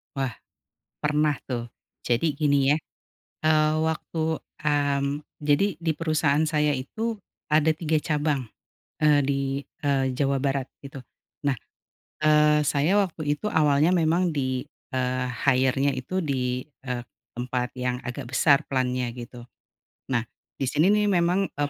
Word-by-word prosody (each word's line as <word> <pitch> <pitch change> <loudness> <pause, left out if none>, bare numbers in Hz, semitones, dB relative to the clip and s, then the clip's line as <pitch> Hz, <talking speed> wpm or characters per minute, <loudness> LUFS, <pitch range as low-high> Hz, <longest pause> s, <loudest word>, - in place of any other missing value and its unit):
Wah 135 -3 -2 0.6
pernah 150 -1 +1
tuh. 120 -2 -4 0.3
Jadi 140 +5 +1
gini 145 -1 +3
ya. - - 0 0.6
Eee, 155 -1 +4
waktu, 160 0 -1 0.2
mmm, 145 -1 0 0.2
jadi 145 +5 +3 0.2
di 165 -1 +1
perusahaan 155 -2 +2
saya 150 -2 +1
itu 220 - -3 0.3
ada 155 +1 +4
3 160 0 0
cabang, 150 -3 0 0.6
eee 150 -1 +5
di, 140 -1 0 0.4
eee, 135 -2 +1
Jawa 140 0 +1
Barat 135 -1 0 0.2
itu. 140 0 -10 0.5
Nah, 140 -2 +2 0.6
eee, 150 0 +5
saya 150 +8 +2
waktu 180 -5 -2 0.2
itu - - -5
awalnya 150 -3 +3
memang 170 +1 +2
di, 130 -1 -1 0.3
eee, 125 0 0 0.2
hire-nya 135 +1 +3
itu 185 +9 -2
di, 125 -5 -1 0.2
eee, 125 -2 -3 0.3
tempat 125 0 -3
yang 125 0 -1
agak 120 +1 -5
besar 145 +1 +4
plant-nya 125 -2 0
gitu. 120 0 -9 0.7
Nah, 120 -2 +2 0.4
di 135 - 0
sini 160 +9 +3
nih 210 0 +3
memang, 180 +1 +2
eee, 145 0 -2
145 Hz, 135 wpm, -25 LUFS, 130-155 Hz, 0.7 s, eee